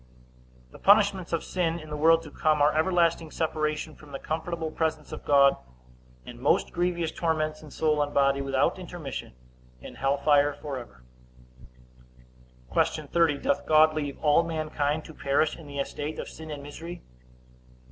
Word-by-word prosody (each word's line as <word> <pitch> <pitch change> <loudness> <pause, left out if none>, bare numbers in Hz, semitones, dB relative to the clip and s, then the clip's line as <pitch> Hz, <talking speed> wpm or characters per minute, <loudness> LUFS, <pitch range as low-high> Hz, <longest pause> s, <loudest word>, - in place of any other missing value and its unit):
A. 60 0 -28
The - - -14
punishments 200 -3 +4
of 165 - -1
sin 170 -2 -1
in 155 -2 -10
the - - -3
world 165 +2 +4
to 150 - -11
come, 155 0 +1
are 145 +1 +3
everlasting 165 -1 +2
separation 155 -1 -2
from 150 -1 -16
the 135 - -4
comfortable 160 +1 -4
presence 155 -1 -2
of - - -7
God, 140 -1 +5 0.7
and - - -10
most - - +1
grievous 175 -2 -1
torments 155 -2 -1
in 155 - -12
soul 150 +1 +1
and 145 0 -1
body, 140 -1 +2
without 135 +5 +1
intermission, 175 - -7 0.5
in - - -10
hell 135 +1 0
fire 145 0 +3
forever. 125 - -8 1.7
Q. - - +1
30. 165 -4 +2
Doth 145 +1 -1
God 155 0 +6
leave 145 -3 -3
all 150 +1 +5
mankind 155 -2 -2
to 160 - -11
perish 145 +2 +1
in 160 - -12
the 140 0 -8
estate 145 +2 -4
of - - -5
sin 160 0 -10
and 145 -2 -6
misery? 165 +4 -9
155 Hz, 165 wpm, -27 LUFS, 140-165 Hz, 1.7 s, God